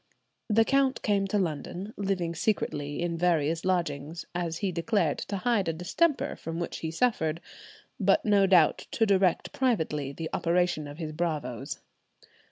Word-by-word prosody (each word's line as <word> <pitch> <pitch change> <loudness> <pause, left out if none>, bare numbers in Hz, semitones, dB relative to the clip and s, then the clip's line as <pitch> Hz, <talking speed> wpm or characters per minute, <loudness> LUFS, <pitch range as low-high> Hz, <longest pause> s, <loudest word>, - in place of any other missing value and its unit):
The 225 +1 +4
count 275 0 +2
came 200 -2 +2
to 205 - 0
London, 180 +3 -3
living 190 -4 -1
secretly 150 -7 -1
in 170 -1 -2
various 165 -2 +1
lodgings, 165 -3 -1
as 170 -2 -2
he 195 0 -1
declared 170 -2 0
to 200 - -4
hide 205 -1 +1
a 165 - 0
distemper 265 - 0
from 165 +1 -5
which 170 - -4
he 160 - -3
suffered, 165 -4 0 0.6
but - - +3
no 200 -2 +4
doubt 175 -5 +4
to 225 - +3
direct 190 -3 +2
privately 160 - 0
the 160 +3 -6
operations 175 -3 +1
of 145 +1 -9
his 160 -2 -4
bravoes. 150 -8 -3
175 Hz, 155 wpm, -28 LUFS, 160-200 Hz, 0.6 s, The